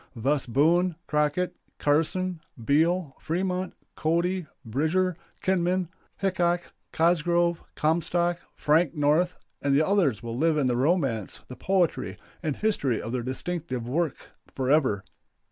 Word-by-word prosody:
Thus 135 +4 0
Boone, 165 +8 +3
Crocket, 150 +4 0 0.2
Carson, 165 +4 +1 0.2
Beal, 160 +1 +2
Fremont, 180 +2 -2 0.2
Cody, 170 +2 0 0.2
Bridger, 160 +10 +1 0.3
Kinman, 185 -2 +1 0.3
Hickok, 175 -2 0 0.2
Cosgrove, 170 +1 +2
Comstock, 170 +2 +1 0.2
Frank 160 +2 +2
North, 155 +5 +2 0.2
and 140 0 +3
others 155 - +2
will 115 0 -4
live 160 +4 +2
in 145 - +2
the 125 -1 +2
romance, 130 - 0
the 125 - -7
poetry, 180 +5 0 0.2
and 155 -5 -1
history 145 - 0
of 115 - -5
their 125 0 -1
distinctive 130 -1 -3
work 160 +4 -2 0.2
forever. 130 -6 +2
160 Hz, 115 wpm, -27 LUFS, 140-180 Hz, 0.3 s, Boone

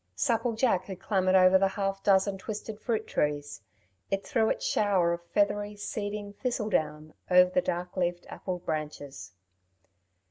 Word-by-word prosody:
Supple 230 - +1
jack 220 -6 +1
had 190 -2 -7
clambered 190 -1 +1
over 185 0 +6
the 195 - +4
half 195 0 -2
dozen 195 0 +2
twisted 215 +1 -6
fruit 220 -2 -1
trees; 145 -4 -2 0.5
it 195 0 -2
threw 225 -6 +1
its - - -2
shower 190 -5 +2
of 170 0 -5
feathery, 205 +2 0
seeding 205 0 -5
thistle 220 -1 -2
down 155 -1 -1 0.2
over 180 0 +6
the 275 - +2
dark 180 -5 -3
leafed 175 -1 -1
apple 185 -1 -5
branches. 145 - -5
195 Hz, 150 wpm, -28 LUFS, 175-210 Hz, 0.5 s, over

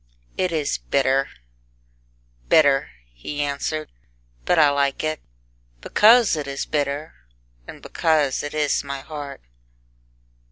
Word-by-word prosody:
"It 185 -1 -1
is 150 - -1
bitter 135 - +1 1.2
bitter," 140 - +4 0.2
he 100 - -7
answered; 145 +2 -3 0.5
"But 180 - +2
I 150 -3 +6
like 140 0 0
it 155 0 -2 0.6
Because 225 - +5
it 150 -2 -4
is 140 0 -4
bitter, 145 0 -2 0.5
And - - -11
because 155 -5 +1
it 145 +1 -6
is 150 -2 +1
my 140 -1 -6
heart." 145 - -8
145 Hz, 115 wpm, -22 LUFS, 140-155 Hz, 1.2 s, I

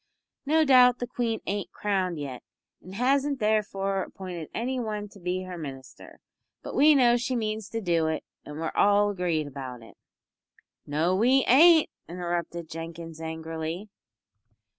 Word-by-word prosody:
"No 315 +1 +4
doubt 250 -3 +6
the 245 - -3
Queen 235 -2 -2
ain't 200 0 -3
crowned 190 -4 -1
yet, 135 -4 -6 0.4
an' 185 - -11
hasn't 270 +5 +1
therefore 200 -3 0
appointed 180 -4 -7
any 255 +3 -2
one 210 -3 -3
to 200 - -16
be 180 +1 -2
her 180 -2 -7
Minister, 135 -3 -10 0.4
but - - -7
we 300 +1 +6
know 240 -3 +5
she 245 +2 -2
means 215 -2 -3
to 225 0 -3
do 170 -4 +1
it 160 0 -2 0.2
and 150 +1 -8
we're 160 0 -2
all 205 0 +4
agreed 175 -5 -1
about 130 -4 -8
it." 115 - -15 0.9
"No 160 +5 +1
we 250 +6 +3
ain't," 320 +5 +7 0.2
interrupted 170 -1 -4
Jenkins, 165 0 -8
angrily. 160 +4 -5
190 Hz, 150 wpm, -27 LUFS, 165-235 Hz, 0.9 s, ain't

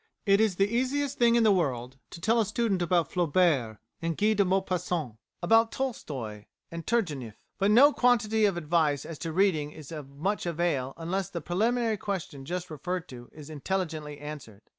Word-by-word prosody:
It 200 0 +4
is 215 -4 +2
the 195 +2 +3
easiest 265 +5 -1
thing 235 -1 +5
in 235 - +4
the 215 - +5
world 130 -8 -1
to - - -10
tell 225 +6 +2
a - - +1
student 215 -4 0
about 175 -2 +1
Flaubert 160 - +2 0.2
and 165 -1 -2
Guy 215 +1 +3
de 205 -1 +3
Maupassant, 180 - -1 0.3
about 225 +5 +4
Tolstoi 130 - -5 0.2
and 165 0 -7
Turgenieff, 150 - -1 0.2
but 195 +1 +3
no 270 +7 +7
quantity 225 -3 +3
of 195 -4 +1
advice 155 -3 +1
as 165 -3 -8
to 165 - -4
reading 160 -4 +2
is 150 -1 -12
of 150 -4 -7
much 175 +8 -2
avail 160 -6 -1
unless 175 +3 -2
the 175 - -4
preliminary 220 +7 0
question 180 -9 -5
just 175 +2 -4
referred 175 +4 -4
to 120 -2 -10
is 150 0 -11
intelligently 155 -2 -3
answered. 140 -8 -9
175 Hz, 180 wpm, -28 LUFS, 150-210 Hz, 0.3 s, no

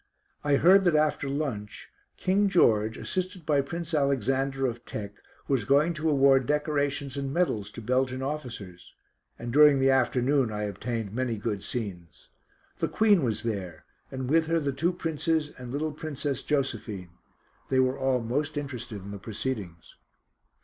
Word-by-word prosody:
I 145 -1 +3
heard 190 +6 +6
that 175 -3 +4
after 150 -2 +1
lunch 135 -8 -4 0.3
King 195 +2 +2
George, 110 - +3
assisted 185 -2 -4
by 145 -2 +3
Prince 170 +3 -5
Alexander 135 -1 +1
of 120 -1 -3
Teck, 100 -1 -6 0.3
was 135 -6 +1
going 145 +9 +3
to 160 0 -1
award 135 -3 +4
decorations 145 -2 -1
and 140 -1 -2
medals 110 - 0
to 115 - -8
Belgian 130 +2 0
officers, 120 -11 -6 0.4
and 120 0 -5
during 150 -1 +7
the 135 0 +4
afternoon 130 0 +2
I 105 0 -3
obtained 105 +1 -4
many 120 -2 -1
good 105 -1 -3
scenes. 95 -10 -6 0.5
The - - +1
Queen 210 -5 +4
was 110 -5 -1
there, 95 -8 -4 0.2
and 130 -1 -4
with 160 +3 +3
her 165 0 +2
the 140 -3 -1
two 165 +7 +1
Princes 160 -2 -1
and 125 -1 -7
little 155 +3 -1
Princess 145 -3 -4
Josephine. 110 - -2 0.6
They 130 - +2
were 130 +1 +2
all 130 -2 +1
most 145 +6 -2
interested 125 -8 -5
in 100 - -7
the 100 - -7
proceedings. 100 -5 -5
135 Hz, 155 wpm, -27 LUFS, 115-150 Hz, 0.6 s, during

